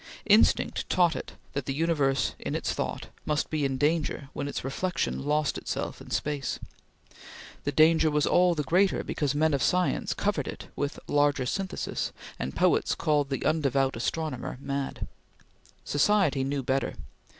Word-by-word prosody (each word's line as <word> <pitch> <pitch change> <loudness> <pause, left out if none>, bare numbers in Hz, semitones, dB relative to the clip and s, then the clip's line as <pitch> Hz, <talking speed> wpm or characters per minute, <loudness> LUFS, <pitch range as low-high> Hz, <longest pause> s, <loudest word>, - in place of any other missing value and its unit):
Instinct 215 +1 +3
taught 175 -2 +3
it - - -6 0.2
that 140 -2 -3
the 135 - -1
universe 140 -6 +1
in - - -3
its - - -1
thought - - -4
must 150 0 -1
be 155 -2 0
in 135 -1 0
danger 150 -1 0
when 140 - -3
its 145 - -4
reflection 170 +4 -2
lost 150 0 +1
itself - - -4
in - - -11
space. 145 -2 -2 1.1
The 145 - +1
danger 160 +1 +5
was 150 0 +2
all 180 -1 +4
the 150 - -1
greater 185 +7 +2
because 145 -2 -1
men 155 +1 +3
of 140 - +1
science 180 +5 +1
covered 195 -10 -1
it - - -7
with 145 0 -2
"larger 145 -2 +2
synthesis," 190 +8 -2 0.3
and 65 - -4
poets - - +2
called 150 -3 +1
the 135 - -2
undevout 140 -4 +2
astronomer 130 +1 -3
mad. 140 0 -3 0.8
Society 145 -3 +2
knew 135 0 -2
better. 135 +2 0
145 Hz, 155 wpm, -28 LUFS, 135-165 Hz, 1.1 s, danger